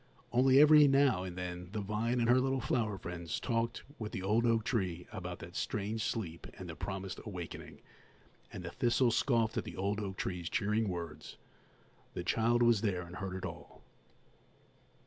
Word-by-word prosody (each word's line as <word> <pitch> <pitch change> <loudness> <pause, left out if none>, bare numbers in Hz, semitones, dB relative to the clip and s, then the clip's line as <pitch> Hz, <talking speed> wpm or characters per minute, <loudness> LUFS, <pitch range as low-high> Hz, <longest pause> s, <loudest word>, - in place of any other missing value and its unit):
Only 130 +2 +5
every 150 0 +8
now 135 -8 +4
and 90 -1 -6
then 90 -1 -5
the 110 - -2
vine 110 +4 -1
and 115 - +2
her 125 +2 +6
little 135 0 +1
flower 110 -5 0
friends 85 -2 -5
talked 115 -1 -1 0.2
with 110 -2 -4
the 95 - -4
old 110 +5 +2
oak 115 -1 +3
tree 95 -7 -1
about 90 -4 -5
that 85 +1 -10
strange 110 +1 -2
sleep 85 -7 -3
and - - -8
the - - -6
promised 95 -1 -5
awakening, 90 -5 -7 0.7
and - - -7
the 85 - -5
thistle 120 +1 +2
scoffed 115 -2 +2
at - - 0
the - - -8
old 100 +2 -1
oak 95 -2 -4
tree's 90 -2 -3
cheering 105 +1 +1
words. 85 -4 -6 0.8
The 90 - -3
child 115 +5 +2
was 120 -3 +4
there 95 -5 0
and 85 +1 -9
heard 95 -2 -4
it 95 -1 -4
all. 85 - -9
105 Hz, 180 wpm, -33 LUFS, 90-115 Hz, 0.8 s, every